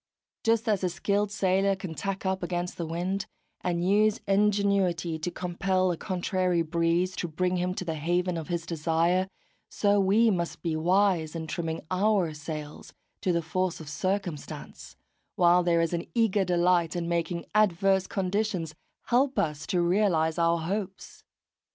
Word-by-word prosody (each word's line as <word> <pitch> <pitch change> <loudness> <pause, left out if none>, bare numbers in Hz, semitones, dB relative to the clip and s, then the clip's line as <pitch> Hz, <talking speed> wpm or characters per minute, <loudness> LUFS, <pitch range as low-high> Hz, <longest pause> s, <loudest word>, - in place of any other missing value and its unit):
Just 225 +1 +2
as 210 -3 +2
the 185 - +1
skilled 200 +5 0
sailor 195 0 +2
can 190 -3 -6
tack 195 +3 -4
up 190 0 0
against 175 0 -3
the 170 - -3
wind, 180 +4 -2 0.4
and 175 0 0
use 215 +2 +3
ingenuity 195 -5 +2
to 155 - -2
compel 185 +1 0
a - - -1
contrary 185 -2 0
breeze 170 +3 0
to 175 - -2
bring 180 +3 -1
him 180 +1 -1
to 185 - -4
the 165 - -2
haven 175 +3 0
of 160 -2 -5
his 170 -2 -2
desire, 170 +3 +1 0.4
so 205 -1 +2
we 210 +4 +4
must 170 -3 -3
be 165 -2 -1
wise 175 -1 +2
in 160 -1 -4
trimming 160 0 -3
our 190 -3 +2
sails 150 0 -7 0.3
to 185 - +1
the 170 -1 0
force 185 +2 -1
of 160 - -9
circumstance; 175 0 -4 0.4
while 175 0 +5
there 170 -1 +2
is 165 +1 0
an 170 0 -2
eager 215 -4 +3
delight 175 -2 +2
in 170 -1 -2
making 170 0 -1
adverse 195 -2 +3
conditions 190 -4 -1 0.3
help 260 +3 +1
us 150 -2 -1
to 175 -2 +1
realise 170 -3 +2
our 170 0 +3
hopes. 195 +3 -5
180 Hz, 160 wpm, -27 LUFS, 170-195 Hz, 0.4 s, while